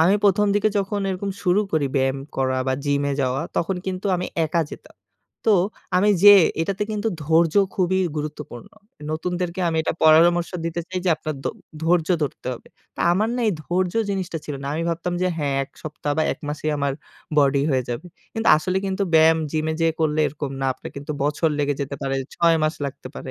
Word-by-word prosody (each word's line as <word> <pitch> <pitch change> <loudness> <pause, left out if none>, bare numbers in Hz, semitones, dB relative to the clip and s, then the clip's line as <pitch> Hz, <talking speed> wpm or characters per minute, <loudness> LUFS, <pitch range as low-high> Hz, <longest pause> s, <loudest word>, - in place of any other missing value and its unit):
আমি 180 +5 +5
১ম 205 +1 +4
দিকে 205 +1 +3
যখন 200 +1 -1
এরকম 195 +2 -3
শুরু 185 +2 +3
করি 155 -3 +2
ব্যায়াম 135 0 +1 0.2
করা 130 -1 +1
বা 130 - +1
জিমে 140 0 +1
যাওয়া, 130 +3 0
তখন 185 +3 0
কিন্তু 190 +1 -3
আমি 180 - -3 0.2
একা 165 +2 +1
যেতাম। - - -12 0.5
তো 215 - +6 0.4
আমি 205 +3 +4
যেয়ে 200 -3 +9 0.2
এটাতে 195 +4 -1
কিন্তু 215 +1 -1
ধৈর্য 160 +1 +3 0.2
খুবই 190 0 +1 0.2
গুরুত্বপূর্ণ। 150 -5 -6 0.4
নতুনদেরকে 180 +2 -3
আমি 165 - -1
এটা - - -1
পরামর্শ 170 +2 +5
দিতে 165 +1 -2
চাই 185 0 -3
যে - - +1
আপনার 155 -1 -4
ধ - - -1 0.4
ধৈর্য 165 0 +2
ধরতে 145 - -4
হবে। 120 - -10 0.3
তো - - -26
আমার 210 +5 +1
না - - -1
এই - - +2
ধৈর্য 180 +1 -1 0.2
জিনিসটা 185 -4 -3
ছিল 150 - -5
না। 140 - -5
আমি 165 - -1
ভাবতাম 170 +1 -2
যে 185 - +2
হ্যাঁ 140 -2 0
১ 135 - -23
সপ্তাহ 150 -1 -3
বা - - +4
১ - - -10
মাসেই 150 +1 -2
আমার 140 -1 0 0.5
বডি 140 -1 +4
হয়ে 130 -1 +2
যাবে। 120 +8 -4 0.3
কিন্তু 225 0 0
আসলে 180 +4 -2
কিন্তু 190 +1 -1
ব্যায়াম 160 0 +6
জিমে 155 0 0
যেয়ে 165 -1 +2
করলে 155 -1 +1
এরকম 145 -1 -5
না 135 - 0
আপনার - - -9
কিন্তু 145 +2 -5
বছর 150 +3 +1
লেগে 145 0 +1
যেতে 140 0 -3
পারে। 135 0 -1 0.2
৬ 170 -1 +4
মাস 155 +1 +1
লাগতে 135 -1 -6
পারে 130 - -7
160 Hz, 200 wpm, -23 LUFS, 145-185 Hz, 0.5 s, যেয়ে